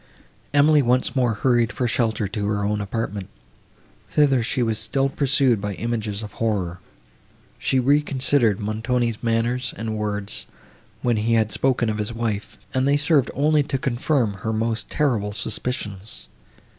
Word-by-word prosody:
Emily 145 Hz, +1 st, +5 dB
once 125 Hz, +2 st, +1 dB
more 125 Hz, -4 st, +2 dB
hurried 120 Hz, 0 st, +2 dB
for 125 Hz, -, -1 dB
shelter 110 Hz, -2 st, 0 dB
to 100 Hz, 0 st, -3 dB
her 105 Hz, -1 st, 0 dB
own 105 Hz, 0 st, 0 dB
apartment. 100 Hz, -1 st, -4 dB, 0.8 s
Thither 140 Hz, -4 st, +3 dB
she 120 Hz, +2 st, 0 dB
was 110 Hz, -2 st, 0 dB
still 135 Hz, +6 st, 0 dB
pursued 135 Hz, -5 st, +2 dB
by 105 Hz, -1 st, -3 dB
images 110 Hz, -2 st, -3 dB
of 105 Hz, -, -7 dB
horror. 95 Hz, -6 st, -1 dB, 0.8 s
She 130 Hz, -, +1 dB
reconsidered 135 Hz, -4 st, +2 dB
Montoni's 115 Hz, +2 st, -1 dB
manner 115 Hz, +1 st, +1 dB, 0.2 s
and 110 Hz, -1 st, -3 dB
words, 105 Hz, -1 st, -3 dB, 0.6 s
when 120 Hz, -2 st, +2 dB
he 115 Hz, +2 st, +2 dB
had 110 Hz, -1 st, +2 dB
spoken 130 Hz, -3 st, +1 dB
of 105 Hz, -1 st, -2 dB
his 105 Hz, +1 st, -2 dB
wife, 110 Hz, -3 st, -3 dB, 0.2 s
and 130 Hz, +1 st, +1 dB
they 145 Hz, +1 st, +4 dB
served 145 Hz, -2 st, +3 dB
only 150 Hz, +2 st, +3 dB
to 140 Hz, -1 st, -2 dB
confirm 125 Hz, -3 st, 0 dB
her 110 Hz, -, -1 dB
most 110 Hz, 0 st, -1 dB
terrible 115 Hz, -9 st, 0 dB
suspicions. 105 Hz, -1 st, -3 dB
115 Hz, 150 wpm, -23 LUFS, 105-130 Hz, 0.8 s, Emily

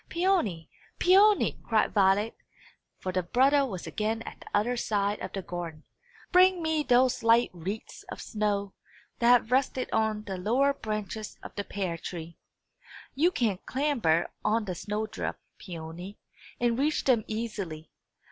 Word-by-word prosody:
"Peony, 335 Hz, -, +1 dB, 0.3 s
Peony!" 400 Hz, +3 st, +4 dB
cried 220 Hz, -2 st, +1 dB
Violet; 200 Hz, +2 st, +3 dB, 0.6 s
for 185 Hz, -, -4 dB
the 185 Hz, 0 st, 0 dB
brother 270 Hz, +9 st, +3 dB
was 195 Hz, -10 st, -4 dB
again 220 Hz, +1 st, -2 dB
at -, -, -9 dB
the -, -, -14 dB
other 225 Hz, +5 st, +1 dB
side 205 Hz, -3 st, 0 dB
of 185 Hz, -, -6 dB
the 195 Hz, -, -4 dB
garden. 170 Hz, -3 st, -6 dB, 0.5 s
"Bring 370 Hz, 0 st, +6 dB
me 315 Hz, -1 st, +1 dB
those 250 Hz, -2 st, +3 dB
light 230 Hz, +1 st, +4 dB
wreaths 185 Hz, +5 st, -6 dB
of -, -, -7 dB
snow 205 Hz, -2 st, -2 dB, 0.5 s
that 235 Hz, -, +2 dB
have 245 Hz, -2 st, +5 dB
rested 260 Hz, 0 st, +1 dB
on 220 Hz, -1 st, +1 dB
the 195 Hz, -3 st, -5 dB
lower 255 Hz, +9 st, +2 dB
branches 215 Hz, -2 st, -5 dB
of -, -, -9 dB
the 205 Hz, -, -3 dB
pear 185 Hz, -5 st, -3 dB
tree. 170 Hz, -1 st, -7 dB, 0.7 s
You 310 Hz, +7 st, +3 dB
can 220 Hz, -, 0 dB
clamber 245 Hz, -, +1 dB
on 215 Hz, +1 st, +1 dB
the 185 Hz, -, -3 dB
snow 210 Hz, +4 st, -3 dB
drift, 215 Hz, 0 st, -4 dB, 0.2 s
Peony, 175 Hz, +2 st, -8 dB, 0.4 s
and 240 Hz, 0 st, +1 dB
reach 300 Hz, +2 st, +1 dB
them 240 Hz, -5 st, +3 dB
easily. 205 Hz, -8 st, -5 dB
215 Hz, 150 wpm, -28 LUFS, 190-250 Hz, 0.7 s, Bring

